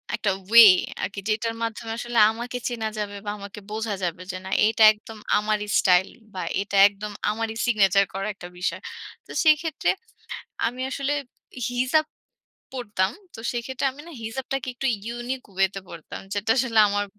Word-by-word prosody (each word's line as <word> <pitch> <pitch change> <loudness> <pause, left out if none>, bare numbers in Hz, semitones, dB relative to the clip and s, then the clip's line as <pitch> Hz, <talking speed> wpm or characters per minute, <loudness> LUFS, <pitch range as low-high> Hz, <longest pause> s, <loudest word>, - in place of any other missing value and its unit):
একটা 200 - 0 0.2
ওয়ে 230 -1 +10 0.4
আরকি 200 0 -3
যেটার 225 +2 0
মাধ্যমে 225 0 -4
আসলে 240 -1 -4
আমাকে 240 +2 -5
চেনা 230 -3 -2
যাবে 205 -1 -3
বা - - -3
আমাকে 200 +1 -9
বোঝা 220 0 -2
যাবে 175 0 -2
যে 185 - -5
না, - - -6 0.2
এটা 220 0 +3
একদম 220 +1 -12 0.2
আমারই 210 0 -1
স্টাইল 180 0 +4 0.3
বা 185 - -4 0.2
এটা 200 0 -4
একদম 205 +1 -7 0.2
আমারই 225 +1 -2
সিগনেচার 200 -4 +4
করা 195 +2 -3
একটা 185 -2 -10
বিষয়। 180 - -2 0.5
তো - - -11
সেক্ষেত্রে 310 0 +3 0.8
আমি 245 +2 -2
আসলে 275 +2 -1 0.6
হিজাব 255 +6 +2 0.7
পড়তাম। 205 -6 -1 0.2
তো - - -9
সেক্ষেত্রে 245 +2 -3
আমি 280 - -12
না? - - -10
হিজাবটাকে 265 +3 -4
একটু 265 +2 -2 0.2
ইউনিক 240 +2 -4
ওয়ে 190 +1 +3
তে 195 - -5
পড়তাম। 165 -2 -9
যেটা 205 +1 -3
আসলে 240 -3 +2
আমার 205 0 0
220 Hz, 160 wpm, -24 LUFS, 205-245 Hz, 0.8 s, ওয়ে